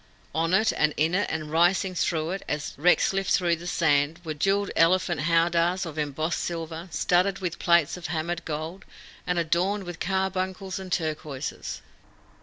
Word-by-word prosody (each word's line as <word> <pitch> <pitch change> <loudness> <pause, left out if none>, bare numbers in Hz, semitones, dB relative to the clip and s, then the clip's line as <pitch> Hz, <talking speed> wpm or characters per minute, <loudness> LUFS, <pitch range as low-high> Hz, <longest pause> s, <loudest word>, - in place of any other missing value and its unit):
On 165 +1 0
it 220 +3 +3
and 150 0 +2
in 160 +3 +2
it 205 +3 +1
and 155 -1 -4
rising 180 +4 +3
through 165 -2 0
it, 195 +1 -4
as 150 -1 -3
wrecks 175 +5 +3
lift 195 0 -1
through 175 -2 +3
the 175 +2 -8
sand, 150 -2 +2
were 155 - -2
jewelled 195 +6 +1
elephant 175 -1 +3
howdahs 170 +3 +2
of 155 -2 -6
embossed 155 +3 -1
silver, 165 0 -4
studded 185 +3 +2
with 180 -3 -4
plates 170 -2 +3
of 175 - -6
hammered 170 +1 -2
gold, 160 +4 -5 0.4
and 180 - 0
adorned 175 +5 +1
with 175 -2 -7
carbuncles 190 0 -2
and 190 -1 -8
turquoises. 155 -4 -3
170 Hz, 165 wpm, -26 LUFS, 160-185 Hz, 0.4 s, it